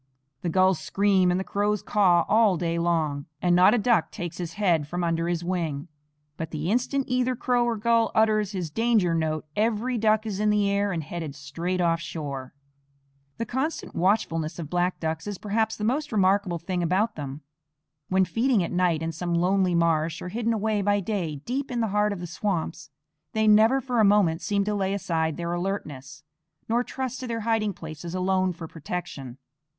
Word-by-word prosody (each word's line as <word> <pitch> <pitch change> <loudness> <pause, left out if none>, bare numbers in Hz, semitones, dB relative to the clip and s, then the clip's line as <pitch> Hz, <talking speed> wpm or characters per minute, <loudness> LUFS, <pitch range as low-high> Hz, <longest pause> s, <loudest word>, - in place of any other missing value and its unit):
The 175 - -1
gulls 185 +1 +3
scream 195 -2 +2
and 180 +1 +1
the - - -2
crows 205 +1 -1
caw 180 -5 +3
all 215 -4 +4
day 170 0 -1
long, 160 -4 0
and 175 0 +2
not 185 +5 +6
a - - +2
duck 225 -5 +2
takes 175 0 -6
his 170 -1 -4
head 175 -8 +1
from 175 +3 -3
under 165 0 0
his 175 -1 -1
wing; 170 -4 -2 0.5
but 165 - -4
the 155 +4 -2
instant 255 +3 0
either 255 0 +1
crow 245 0 +1
or 235 -1 0
gull 230 +1 +2
utters 215 -2 +3
his 180 -6 -4
danger 225 -4 +2
note 155 -1 -1
every 230 +3 0
duck 215 0 +2
is 205 -3 -3
in 210 0 +2
the 210 -1 +2
air 200 0 +1
and 165 -3 -2
headed 155 -2 -6
straight 165 +7 -3
off 165 -1 +2
shore. 140 -5 -6 0.8
The 230 - -2
constant 265 +8 -3
watchfulness 165 -4 0
of 160 -4 -7
black 180 +1 0
ducks 160 +2 -3
is 205 -2 -4
perhaps 220 +2 -1
the 210 - -5
most 275 +7 0
remarkable 195 -3 +2
thing 175 +2 -3
about 190 +6 +1
them. 140 0 -6 0.7
When 190 0 +3
feeding 230 -1 +1
at - - -4
night 175 -3 +1
in 165 - -2
some 175 +1 -2
lonely 180 +1 +2
marsh, 165 -1 +1
or 180 - -6
hidden 230 +3 -1
away 215 -1 0
by 205 +1 +2
day 185 -6 -2
deep 270 +3 -2
in 245 -2 -2
the 225 -2 0
heart 210 0 +2
of 200 - -4
the - - -4
swamps, 175 -3 -3 0.4
they 220 0 +2
never 220 +5 +6
for 250 -2 -1
a - - +6
moment 195 -5 +3
seem 200 +4 0
to 210 +1 -1
lay 195 -1 0
aside 160 -5 -1
their 170 0 -3
alertness, 155 -6 -4 0.4
nor 235 +2 +1
trust 260 0 -4
to 255 - -5
their 230 -1 -3
hiding 220 -1 +1
places 165 +1 -7
alone 185 0 +1
for 165 -1 -8
protection. 150 -6 -6
185 Hz, 195 wpm, -26 LUFS, 165-215 Hz, 0.8 s, not